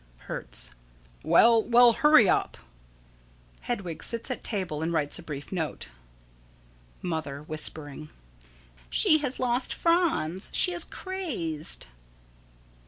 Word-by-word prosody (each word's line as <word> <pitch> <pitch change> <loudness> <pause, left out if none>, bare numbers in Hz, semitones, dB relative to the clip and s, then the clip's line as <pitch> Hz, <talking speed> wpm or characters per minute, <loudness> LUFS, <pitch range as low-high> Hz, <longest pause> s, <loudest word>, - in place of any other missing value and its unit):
Hertz: - - -4 0.5
Well, 230 - +5
well, 240 +1 +5
hurry 285 -5 +5
up! - - 0 1.0
[Hedwig 185 -9 -4
sits 230 +2 0
at 255 - -5
table 185 -8 -3
and 165 +1 -1
writes 150 -2 -1
a - - -8
brief 145 -4 -8
note.] 160 - -4 1.1
Mother: 155 -5 -4
[Whispering.] 155 -1 -6 0.8
She 310 - +4
has 275 -3 -3
lost 250 0 0
Franz. 330 - +1
She 360 - +5
is 345 -1 -1
crazed. 255 - -4
185 Hz, 105 wpm, -27 LUFS, 155-255 Hz, 1.1 s, Well